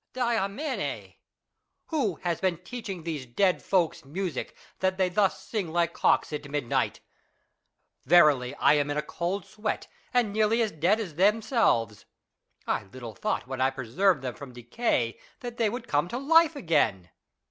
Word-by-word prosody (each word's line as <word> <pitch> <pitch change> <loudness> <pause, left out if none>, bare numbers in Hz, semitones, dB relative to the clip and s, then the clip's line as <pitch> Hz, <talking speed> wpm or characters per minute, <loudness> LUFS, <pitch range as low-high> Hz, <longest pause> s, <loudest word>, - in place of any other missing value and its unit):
Diamine! 235 +2 -2 0.8
Who 260 - 0
has 175 -2 -1
been 185 -3 +1
teaching 200 -7 -6
these 155 -6 -4
dead 185 +10 +2
folks 180 -4 +1
music, 165 +1 -4 0.2
that 185 0 +1
they 185 -1 +2
thus 195 +1 +1
sing 200 -8 -3
like 170 0 +1
cocks, - - +2
at 150 -1 -5
midnight? 140 -4 -1 1.0
Verily 150 -8 +5
I - - +4
am 145 -1 +1
in 145 - -1
a 150 - 0
cold 175 +5 -3
sweat, 215 0 -3 0.3
and 240 -5 +1
nearly 220 +2 +2
as 220 - -1
dead 175 +8 +2
as 190 -8 -5
them 205 +7 +3
selves. 115 - +1 0.6
I - - -1
little 115 +3 -9
thought - - -2
when 130 0 -5
I 130 - +4
preserved 135 - +1
them 125 -2 -3
from 140 -3 -10
decay, 120 - -1 0.2
that 240 -2 -6
they 225 -2 +2
would 235 +2 -6
come 145 -1 +1
to 235 - -4
life 325 +3 +4
again. 145 - +1
175 Hz, 160 wpm, -27 LUFS, 140-215 Hz, 1.0 s, Verily